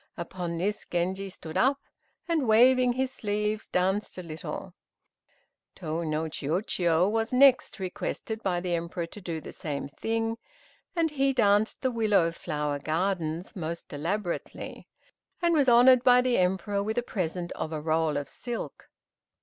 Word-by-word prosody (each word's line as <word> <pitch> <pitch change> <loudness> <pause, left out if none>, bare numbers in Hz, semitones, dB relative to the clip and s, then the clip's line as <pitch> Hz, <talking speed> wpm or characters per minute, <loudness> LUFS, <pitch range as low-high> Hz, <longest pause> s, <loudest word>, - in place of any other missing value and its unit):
Upon 170 0 -4
this 205 +5 -2
Genji 190 +3 -1
stood 160 -3 -6
up, 275 +2 +3 0.5
and 320 -7 +1
waving 250 +3 +5
his 260 +1 -1
sleeves, 210 -1 -2
danced 190 +3 0
a 180 - -5
little. 160 -1 -6 1.0
Tô 165 -1 -3
no 155 +1 0
Chiûjiô 170 +3 0
was 225 0 0
next 260 0 +5
requested 205 +4 -4
by 180 -4 0
the 180 -1 -2
Emperor 170 0 -2
to 200 +5 -11
do 170 -3 -4
the - - -9
same 140 -3 -4
thing, 225 +8 -2 0.6
and 330 -2 +1
he 275 -2 +2
danced 210 -3 +2
the 260 - +2
"Willow 210 -7 +2
Flower 150 -3 -3
Gardens" 165 +1 -2
most 170 -3 -5
elaborately, 175 +5 -4 0.5
and 345 -1 +2
was 285 -5 +4
honored 245 +1 +7
by 250 -1 +7
the 250 -3 +2
Emperor 190 +2 +1
with 220 +3 -3
a 245 - +2
present 175 -5 -3
of 155 - -4
a 155 - -3
roll 155 -1 +1
of 145 - -3
silk. 240 -2 -6
190 Hz, 150 wpm, -28 LUFS, 165-235 Hz, 1.0 s, honored